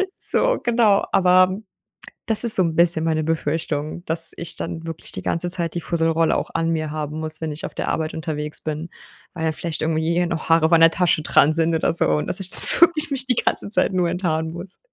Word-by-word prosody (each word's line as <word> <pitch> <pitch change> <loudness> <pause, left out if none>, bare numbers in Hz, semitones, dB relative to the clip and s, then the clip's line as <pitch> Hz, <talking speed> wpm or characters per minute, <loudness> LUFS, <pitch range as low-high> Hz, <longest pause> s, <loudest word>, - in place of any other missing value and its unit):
So, - - +2
genau, 230 -4 +2
aber 185 0 +4 0.7
das 225 -2 -1
ist 235 - +7
so 190 - +3
´n 165 -2 -1
bisschen 170 -1 +3
meine 160 -1 0
Befürchtung, 155 0 -3
dass 165 0 +4
ich 170 - -8
dann 165 0 -6
wirklich 165 -1 -8
die - - -6
ganze 175 +1 -1
Zeit 170 -3 -1
die 175 - -3
Fusselrolle 165 -1 0
auch - - -4
an 165 0 0
mir 155 -2 -2
haben 155 0 -5
muss, 155 0 -2
wenn 160 -2 -4
ich 150 - -6
auf - - -11
der - - -4
Arbeit 155 0 -2
unterwegs 150 -1 -5
bin, 155 +2 -5 0.5
weil 160 -2 -5
dann 160 - 0
vielleicht 160 0 -6
irgendwie 165 +2 0
noch 170 -2 -5
Haare 165 -1 +4
auch 160 - -3
an 165 - +5
der 165 - +7
Tasche 175 -2 0
dran 150 0 +3
sind 165 0 +1
oder 160 - 0
so 165 - +4
und 75 -1 0
dass - - 0
ich 185 -1 -5
dann - - +2 0.2
wirklich 335 -2 +3
mich 265 -2 -2
die 250 -2 0
ganze - - -1
Zeit 210 - 0
nur 180 -2 +1
enthaaren 165 -3 -2
muss. 175 +3 -5
165 Hz, 230 wpm, -21 LUFS, 160-180 Hz, 0.7 s, ist